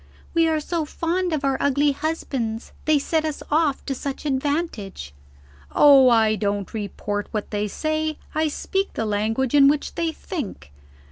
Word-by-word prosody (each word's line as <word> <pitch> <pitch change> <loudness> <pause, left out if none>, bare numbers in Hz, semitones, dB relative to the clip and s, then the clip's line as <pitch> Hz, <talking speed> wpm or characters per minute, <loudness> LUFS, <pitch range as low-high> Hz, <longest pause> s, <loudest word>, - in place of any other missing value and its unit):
'We 330 -1 +4
are 315 -1 +1
so 330 +2 -2
fond 345 +4 -1
of 300 -3 -1
our 270 -1 +1
ugly 285 +1 +3
husbands; 270 -7 -3
they 310 -1 +4
set 315 +3 0
us 310 -2 -3
off 300 -2 +1
to 275 - -1
such 275 +2 -5
advantage.' 265 - -2 0.6
Oh, 275 -3 +8
I 220 -2 +4
don't 205 -2 -2
report 205 -1 -3
what 210 -2 -4
they 210 0 -1
say; 310 +6 -2 0.2
I 315 0 +1
speak 390 +6 -2
the 225 - -2
language 220 +4 0
in 280 -1 +7
which 290 +1 +1
they 335 -1 -1
think. 275 - -6
280 Hz, 160 wpm, -23 LUFS, 220-315 Hz, 0.6 s, Oh